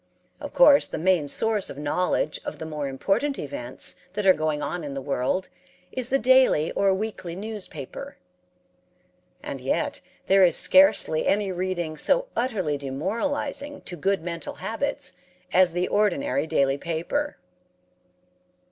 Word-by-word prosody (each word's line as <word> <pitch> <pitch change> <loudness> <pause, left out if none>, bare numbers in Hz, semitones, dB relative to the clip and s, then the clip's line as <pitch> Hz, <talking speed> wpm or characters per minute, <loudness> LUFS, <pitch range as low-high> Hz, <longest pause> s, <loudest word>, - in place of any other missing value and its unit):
Of - - -7
course 290 -13 +6
the - - -5
main 170 -2 +2
source 215 +5 +1
of - - -8
knowledge 150 +1 -1
of - - -6
the 160 - -6
more 150 -2 -4
important 205 - 0
events 130 -3 -3 0.2
that 210 0 -2
are 190 - +8
going 155 -2 -1
on 175 +3 -3
in 140 -2 -6
the - - -3
world 140 +7 -1 0.4
is 255 -1 -2
the 270 - +3
daily 260 - +4
or 195 -1 +2
weekly 190 -4 -4
newspaper; 220 - -7 1.3
and - - -6
yet - - -1 0.2
there 195 0 +5
is 175 - +5
scarcely 280 - +4
any 200 -1 +1
reading 175 -3 -3
so - - +2
utterly 190 - -1
demoralizing 235 - -2
to 180 - -7
good 195 +4 0
mental 170 0 -6
habits 280 +6 -3 0.4
as 180 -2 +5
the 180 +1 0
ordinary 165 -8 +1
daily 140 -2 +1
paper. 170 - -2
185 Hz, 140 wpm, -25 LUFS, 155-225 Hz, 1.3 s, are